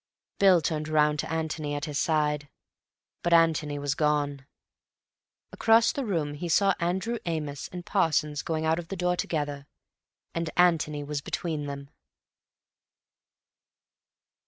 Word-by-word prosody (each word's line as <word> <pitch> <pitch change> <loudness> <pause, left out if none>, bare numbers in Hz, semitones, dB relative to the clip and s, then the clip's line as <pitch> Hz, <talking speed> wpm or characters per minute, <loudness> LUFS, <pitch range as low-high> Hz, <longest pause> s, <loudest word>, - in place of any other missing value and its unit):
Bill 190 -4 +6
turned 155 -1 -2
round 150 -1 +2
to - - -3
Antony 155 -2 -2
at 145 +1 -3
his 150 -3 -3
side. 150 -3 0 0.7
But 175 - +1
Antony 160 -3 +2
was 145 -1 -1
gone. 145 -2 0 1.0
Across 230 +1 +4
the 280 - -3
room 160 -7 -1
he 170 +4 -5
saw 195 +3 +4
Andrew 190 +7 -1
Amos 150 -4 -3
and 180 -1 -8
Parsons 150 -2 +1
going 160 -1 -2
out 160 +1 +2
of 170 - -7
the 195 - -5
door 180 0 0
together, 145 -4 -3 0.7
and 165 -1 -2
Antony 160 -4 +3
was 145 0 -3
between 155 -1 -3
them. 140 0 -7
155 Hz, 135 wpm, -27 LUFS, 145-170 Hz, 1.0 s, Bill